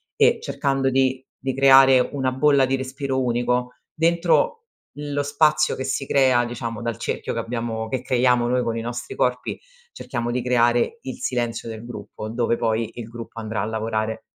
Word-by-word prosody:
e -, -, +4 dB
cercando 135 Hz, -1 st, 0 dB
di 130 Hz, 0 st, +1 dB, 0.2 s
di 135 Hz, 0 st, -2 dB
creare 135 Hz, -1 st, +7 dB
una 130 Hz, 0 st, -2 dB
bolla 140 Hz, 0 st, +4 dB
di 130 Hz, +1 st, 0 dB
respiro 130 Hz, 0 st, -2 dB
unico, 125 Hz, +1 st, 0 dB, 0.2 s
dentro 170 Hz, -, +2 dB, 0.5 s
lo 145 Hz, -1 st, -2 dB
spazio 155 Hz, +2 st, +2 dB
che 130 Hz, -, -4 dB
si 135 Hz, +1 st, -2 dB
crea, 130 Hz, -3 st, +3 dB
diciamo, 115 Hz, -2 st, -5 dB
dal 115 Hz, -3 st, -3 dB
cerchio -, -, -3 dB
che -, -, -2 dB
abbiamo 115 Hz, -1 st, -3 dB
che 130 Hz, +2 st, -2 dB
creiamo 125 Hz, -1 st, +2 dB
noi 125 Hz, 0 st, +2 dB
con 115 Hz, -2 st, -2 dB
i 115 Hz, -, -3 dB
nostri 120 Hz, 0 st, -5 dB
corpi, 125 Hz, 0 st, -1 dB, 0.4 s
cerchiamo 120 Hz, -, -4 dB
di 125 Hz, +1 st, -1 dB
creare 120 Hz, -, +2 dB
il 130 Hz, -, -5 dB
silenzio 120 Hz, -2 st, -2 dB
del 110 Hz, +1 st, -8 dB
gruppo, 110 Hz, -2 st, -8 dB
dove 115 Hz, +1 st, 0 dB
poi 115 Hz, -1 st, 0 dB
il 120 Hz, -2 st, -7 dB
gruppo 115 Hz, 0 st, -9 dB
andrà 110 Hz, -2 st, -3 dB
a -, -, -1 dB
lavorare. 110 Hz, 0 st, -2 dB
125 Hz, 175 wpm, -23 LUFS, 115-135 Hz, 0.5 s, creare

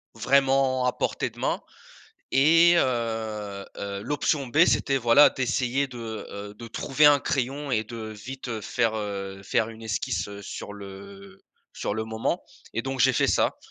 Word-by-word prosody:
vraiment 135 Hz, +1 st, +3 dB
à 125 Hz, -, +2 dB
portée -, -, -2 dB
de -, -, -16 dB
main -, -, 0 dB, 0.7 s
et 165 Hz, +5 st, +6 dB
heu 110 Hz, -6 st, -2 dB
heu, 100 Hz, 0 st, -4 dB
l'option 145 Hz, 0 st, 0 dB
B 120 Hz, -, 0 dB
c'était 115 Hz, +4 st, +2 dB
voilà 120 Hz, +4 st, +6 dB
d'essayer 130 Hz, +1 st, 0 dB
de, 125 Hz, -2 st, -10 dB, 0.3 s
heu, 100 Hz, 0 st, -7 dB
de 115 Hz, +2 st, -10 dB
trouver 140 Hz, +6 st, +2 dB
un 145 Hz, -1 st, +7 dB
crayon 140 Hz, 0 st, -2 dB
et 110 Hz, -2 st, +1 dB
de 115 Hz, +2 st, -9 dB
vite, 110 Hz, +5 st, -7 dB
heu, 110 Hz, -2 st, -4 dB
faire, 110 Hz, +2 st, 0 dB
heu, 100 Hz, -2 st, -5 dB
faire 110 Hz, -, +1 dB
une 115 Hz, 0 st, -11 dB
esquisse, 110 Hz, -1 st, -2 dB
heu, 100 Hz, 0 st, -8 dB
sur 105 Hz, -, -7 dB
le 100 Hz, -1 st, -11 dB, 0.3 s
sur -, -, -3 dB
le 110 Hz, -, -2 dB
moment 110 Hz, 0 st, -2 dB, 0.3 s
et 115 Hz, -, -1 dB
donc, 135 Hz, 0 st, -4 dB
j'ai -, -, +5 dB
fait -, -, +2 dB
ça, -, -, +2 dB
115 Hz, 170 wpm, -26 LUFS, 105-135 Hz, 0.7 s, un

